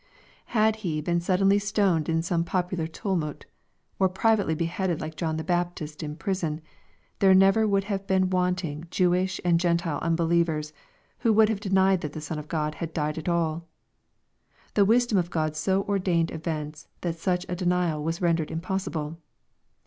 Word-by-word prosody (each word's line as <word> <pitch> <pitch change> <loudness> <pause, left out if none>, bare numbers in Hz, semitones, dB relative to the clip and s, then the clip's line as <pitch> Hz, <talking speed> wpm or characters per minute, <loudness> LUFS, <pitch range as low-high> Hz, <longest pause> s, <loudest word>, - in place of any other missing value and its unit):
Had 220 -1 +2
He 170 -8 -2
been 170 +3 0
suddenly 195 +3 +3
stoned 200 -6 +1
in 165 0 +1
some 170 -1 0
popular 180 -1 -1
tumult, 165 -3 -3 0.3
— - - -44
or 190 -1 +4
privately 200 -2 +2
beheaded 170 +1 -1
like 155 0 -6
John 160 0 -2
the 160 - -3
Baptist 175 -3 -2
in 150 -1 -5
prison, 165 -3 -2 0.6
there 190 -1 +6
never 195 +3 +5
would 195 -1 +2
have 195 -1 -4
been 190 -1 +2
wanting 180 -4 -1
Jewish 185 +1 +1
and 170 -1 +4
Gentile 170 -3 0
unbeliever, 165 -1 +1 0.6
who 230 - +2
would 215 0 +5
have 220 -3 -1
denied 190 -2 +2
that 150 -1 -5
the - - -5
Son 155 +1 -4
of 150 - -9
God 155 -2 -1
had 165 -1 -4
died 155 0 -1
at 160 - -3
all. 165 -1 -1 1.1
The 200 - +4
wisdom 230 -1 +3
of 175 -1 -2
God 155 -2 -1
so 190 +5 +1
ordered 180 -5 0
events 155 -2 -5
that 170 -2 -3
such 180 +1 0
a 180 - -3
denial 175 -4 0
was 165 +3 -2
rendered 165 -2 +1
impossible. 165 -3 -3
175 Hz, 170 wpm, -26 LUFS, 160-190 Hz, 1.1 s, there